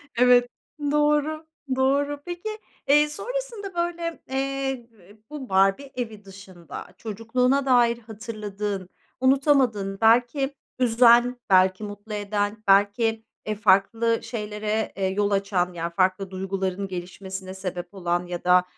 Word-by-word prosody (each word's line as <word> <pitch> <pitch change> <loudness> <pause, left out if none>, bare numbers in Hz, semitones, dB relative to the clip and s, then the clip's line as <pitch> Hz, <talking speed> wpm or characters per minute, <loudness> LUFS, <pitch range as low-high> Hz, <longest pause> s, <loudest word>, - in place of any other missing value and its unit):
Evet, 245 0 +5 0.4
doğru, 300 +1 +1 0.3
doğru. 280 +2 +1
Peki, 350 +4 -5 0.4
eee, 295 +1 +5
sonrasında, 455 +1 -5
böyle, 340 -1 -2
eee, 270 -2 -2
b 205 -2 -19
bu 290 -6 -7
Barbie 195 +8 +2
evi 220 -4 -5
dışında 190 -3 -10
çocukluğuna 250 +5 0
dair 240 -2 +4
hatırladığın, 210 -4 -5 0.3
unutamadığın, 260 -7 +2
belki 245 +5 +3 0.2
üzen 240 0 +5
belki 185 +2 +4
mutlu 205 +1 -8
eden 205 +1 -2
belki, 205 +3 +3 0.2
eee, 215 0 -2
farklı 215 +3 +3
şeylere, 215 -1 -3
eee, 195 - 0
yol 205 +2 0
açan, 195 -2 0
yani 170 0 -4
farklı 185 +1 +1
duyguların 190 0 -3
gelişmesine 190 +1 -7
sebep 185 -1 -6
olan 175 -2 -1
ya 175 -1 -5
da, 180 0 +5
220 Hz, 120 wpm, -25 LUFS, 195-265 Hz, 0.4 s, Evet